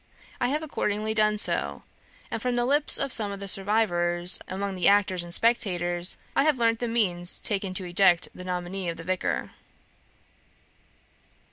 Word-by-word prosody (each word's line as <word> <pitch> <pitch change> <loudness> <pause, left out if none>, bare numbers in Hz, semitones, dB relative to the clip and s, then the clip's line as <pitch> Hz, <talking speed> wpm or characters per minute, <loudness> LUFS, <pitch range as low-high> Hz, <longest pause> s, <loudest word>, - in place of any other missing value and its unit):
I - - 0
have 300 +4 -2
accordingly 215 -7 -3
done 215 -1 +1
so, - - +1 0.5
and, - - -4
from 250 -1 -2
the 240 0 0
lips 290 +3 +4
of 275 -2 -1
some 210 -3 +2
of 200 - -7
the 200 - -7
survivors 180 -3 +2
among 195 +1 -4
the 180 -2 0
actors 195 -3 +2
and 175 - -11
spectators, 175 -5 +1 0.2
I - - +3
have 300 -2 +1
learnt 230 -1 +1
the 240 - -3
means 185 -7 +2
taken 195 -3 -3
to 185 - -3
eject 175 -1 +2
the 180 - -11
nominee 180 0 -4
of 165 - -6
the 165 - -9
Vicar. 185 +2 -3
195 Hz, 165 wpm, -25 LUFS, 180-225 Hz, 0.5 s, lips